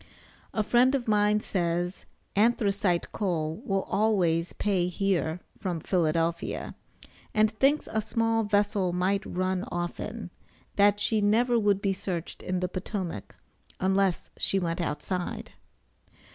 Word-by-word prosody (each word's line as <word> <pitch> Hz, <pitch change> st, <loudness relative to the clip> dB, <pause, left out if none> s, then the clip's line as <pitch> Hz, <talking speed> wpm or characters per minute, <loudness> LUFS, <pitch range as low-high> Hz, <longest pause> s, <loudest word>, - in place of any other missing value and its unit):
A 215 Hz, -, 0 dB
friend 245 Hz, +5 st, +4 dB
of 245 Hz, -4 st, -2 dB
mine 210 Hz, 0 st, +3 dB
says, 175 Hz, -1 st, -1 dB, 0.3 s
anthracite 205 Hz, -4 st, +2 dB
coal 165 Hz, -3 st, -2 dB
will 195 Hz, -6 st, 0 dB
always 180 Hz, -6 st, +1 dB
pay 190 Hz, -4 st, 0 dB
here 180 Hz, -3 st, 0 dB, 0.2 s
from 180 Hz, -5 st, -2 dB
Philadelphia, 165 Hz, 0 st, 0 dB, 0.6 s
and 215 Hz, 0 st, +4 dB
thinks 270 Hz, +7 st, +2 dB
a 220 Hz, -, +1 dB
small 225 Hz, +1 st, +1 dB
vessel 205 Hz, -3 st, +1 dB
might 190 Hz, +2 st, +1 dB
run 185 Hz, 0 st, -1 dB
often 180 Hz, +3 st, -4 dB, 0.4 s
that 205 Hz, 0 st, +4 dB
she 215 Hz, +1 st, +1 dB
never 235 Hz, +4 st, +3 dB
would 205 Hz, -2 st, +2 dB
be 195 Hz, -1 st, +2 dB
searched 185 Hz, -3 st, -5 dB
in 185 Hz, 0 st, -2 dB
the 180 Hz, -, +1 dB
Potomac, 185 Hz, -, -5 dB, 0.4 s
unless 190 Hz, -1 st, +1 dB
she 195 Hz, -, +1 dB
went 175 Hz, -2 st, -1 dB
outside. 175 Hz, +3 st, -3 dB
195 Hz, 125 wpm, -28 LUFS, 175-210 Hz, 0.6 s, friend